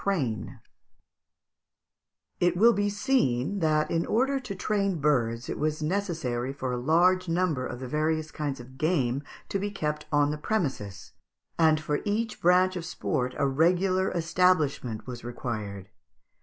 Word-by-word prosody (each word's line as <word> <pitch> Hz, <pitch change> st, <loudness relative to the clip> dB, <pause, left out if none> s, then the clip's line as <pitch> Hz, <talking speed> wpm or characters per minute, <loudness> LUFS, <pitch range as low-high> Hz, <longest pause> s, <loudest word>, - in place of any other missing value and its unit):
] -, -, +2 dB, 2.3 s
It 175 Hz, 0 st, +2 dB
will 230 Hz, +5 st, +6 dB
be 205 Hz, -1 st, +1 dB
seen 200 Hz, -, +1 dB
that, 155 Hz, -2 st, +1 dB
in 165 Hz, 0 st, +1 dB
order 270 Hz, +4 st, +1 dB
to 245 Hz, -7 st, -6 dB
train 195 Hz, -2 st, 0 dB
birds, 120 Hz, -5 st, +1 dB
it -, -, -4 dB
was 155 Hz, +1 st, -1 dB
necessary 155 Hz, -9 st, -1 dB
for 130 Hz, -2 st, -4 dB
a 125 Hz, -, -1 dB
large 175 Hz, +6 st, +3 dB
number 165 Hz, -7 st, 0 dB
of 120 Hz, -, -7 dB
the 130 Hz, -, -6 dB
various 155 Hz, +3 st, -1 dB
kinds 145 Hz, -4 st, -3 dB
of 130 Hz, +2 st, -13 dB
game 140 Hz, -6 st, +1 dB, 0.3 s
to 200 Hz, -, -1 dB
be 205 Hz, +1 st, -2 dB
kept 150 Hz, -6 st, -3 dB
on 145 Hz, -1 st, +3 dB
the 150 Hz, -, -4 dB
premises, 105 Hz, -, -3 dB, 0.5 s
and 160 Hz, -1 st, +5 dB
for 150 Hz, -1 st, -1 dB
each 215 Hz, +1 st, -2 dB
branch 180 Hz, +1 st, +4 dB
of 175 Hz, -, -4 dB
sport 125 Hz, -5 st, -2 dB
a 140 Hz, -, +2 dB
regular 180 Hz, +6 st, +2 dB
establishment 160 Hz, -10 st, +1 dB
was 125 Hz, -1 st, -7 dB
required. 110 Hz, -5 st, -5 dB
155 Hz, 150 wpm, -27 LUFS, 130-185 Hz, 2.3 s, will